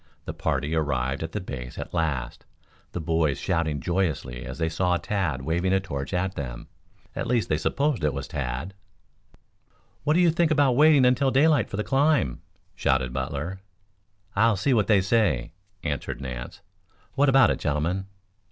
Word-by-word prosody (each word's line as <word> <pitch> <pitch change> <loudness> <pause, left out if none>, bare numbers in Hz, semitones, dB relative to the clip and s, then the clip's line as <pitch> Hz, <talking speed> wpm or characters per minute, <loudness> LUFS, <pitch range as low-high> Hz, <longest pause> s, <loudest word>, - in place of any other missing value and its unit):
The - - -4
party 75 0 -1
ar 80 - +3
rived 65 -2 -1
at 80 0 -4
the 105 - -3
base 65 -9 -7
at - - -6
last, 75 -8 -2 0.5
the - - -4
boys 80 -3 0
shouting 80 -5 -1
joyously 80 -7 -2
as - - -6
they 80 -1 0
saw 90 +2 +1
Tad 85 -10 -2
waving 85 +5 0
a 95 - +4
torch 70 -8 -5
at 95 0 -1
them. - - -6 0.5
At - - -3
least 120 -2 +1
they 75 - +2
supposed 140 - 0
it 75 - +2
was - - -5
Tad. 70 +8 -4 1.3
"What 150 - +2
do - - +4
you 175 -2 +5
think 170 0 +2
about 145 -5 +3
waiting 150 -1 +6
until 130 +2 +3
daylight 140 -2 +3
for 100 - -5
the 105 - 0
climb?" 140 - +2 0.3
shouted 65 -1 0
Butler. 70 +7 -3 0.8
"I'll 110 0 +3
see 130 +8 +2
what 110 -4 +2
they 105 -3 +5
say," 95 - +1 0.3
answered 70 -5 -3
Nance. 60 -2 -7 0.5
"What 140 +1 +3
about 135 -4 +6
it, - - -2
gentlemen?" 85 +6 -1
85 Hz, 170 wpm, -25 LUFS, 70-115 Hz, 1.3 s, waiting